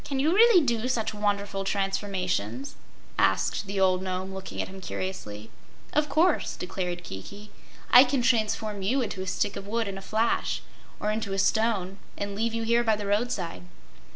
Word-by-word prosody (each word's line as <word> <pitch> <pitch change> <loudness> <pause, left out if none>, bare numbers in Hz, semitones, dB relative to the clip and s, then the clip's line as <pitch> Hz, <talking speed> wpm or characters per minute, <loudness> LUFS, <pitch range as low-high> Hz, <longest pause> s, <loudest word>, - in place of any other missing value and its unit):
"Can 275 - -3
you 305 +5 +3
really 425 -6 +6
do 235 -1 0
such 235 -5 -1
wonderful 200 -1 -1
transformations?" 190 - -2 0.5
asked 95 - +2
the 200 0 -2
old 185 -1 +3
Nome, 190 0 -3
looking 190 0 -7
at - - -1
him 190 0 -10
curiously. 110 - -5 0.4
"Of 300 0 +2
course," 325 +6 +2
declared 180 -1 -4
Kiki. 200 - -9 0.4
"I 250 - +10
can 260 -1 0
transform 215 -3 +1
you 250 +7 +1
into 200 -4 -4
a 190 - -5
stick 200 +2 -1
of 195 - -7
wood, 225 +1 -1
in 195 -1 -5
a - - -11
flash, 220 +4 0 0.4
or 210 - 0
into 215 -2 -2
a - - -1
stone, 195 -1 +1 0.2
and 200 0 -3
leave 225 +3 -1
you 230 - -1
here 235 +1 +3
by 220 -2 +3
the 205 -1 -5
roadside." 205 -4 -1
200 Hz, 180 wpm, -27 LUFS, 190-230 Hz, 0.5 s, I